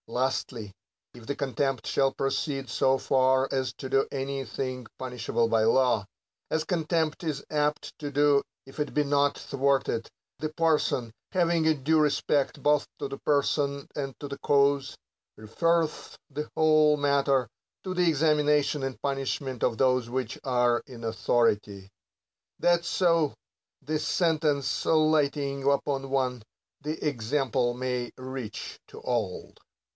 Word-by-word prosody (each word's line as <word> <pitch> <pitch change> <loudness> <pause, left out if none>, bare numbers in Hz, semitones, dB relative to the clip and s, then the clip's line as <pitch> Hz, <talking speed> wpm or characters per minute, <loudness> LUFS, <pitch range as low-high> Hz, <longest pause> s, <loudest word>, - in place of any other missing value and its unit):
Lastly, 120 -3 -2 0.4
if 120 -2 -13
the 140 - -2
contempt 135 -2 -1
shall 135 -1 +2
proceed 135 0 -2
so 130 +3 +2
far 130 0 +2
as 130 -1 -1
to 135 - -6
do 135 +1 +2
any 135 0 -3
thing 130 0 -5
punish 125 -2 -6
able 115 -1 +2
by 115 -1 +2
law, 115 -2 +3 0.4
as 160 - 0
contempt 165 -2 -1
is 150 -4 -3
apt 150 0 -1
to 145 -2 -5
do 145 0 +4 0.2
if 135 +3 -13
it 150 - -2
be 150 - +3
not 145 0 +2
thwarted, 135 -4 0 0.3
the 155 +2 -2
parson, 155 -7 +1 0.2
having 170 -3 +2
a 160 - +4
due 155 +3 +2
respect 145 -1 +1
both 150 0 +3
to 145 - -3
the 135 0 -7
person 140 -1 0
and 135 -2 -4
to 145 - -6
the 140 0 -7
cause, 140 -1 +2 0.4
referreth 165 +9 0
the 150 +2 -4
whole 155 -1 +5
matter 140 -3 +2 0.4
to 185 - -3
the 180 -2 +3
examination 150 -1 +2
and 135 -1 -4
punishment 135 -2 -2
of 110 - +1
those 130 -2 +2
which 125 -2 -3
are 125 -2 +2
in 120 -3 -10
authority: 105 -3 0 0.7
that 175 -1 +3
so, 165 -5 +2 0.5
the 155 +2 -1
sentence 155 -4 +1
lighting 145 -3 +2
upon 135 -1 -1
one, 130 -3 0 0.4
the 150 +1 -3
example 125 -1 0
may 125 -1 -2
reach 130 -4 -6
to - - -11
all. 115 -7 -2
140 Hz, 140 wpm, -27 LUFS, 130-150 Hz, 0.7 s, whole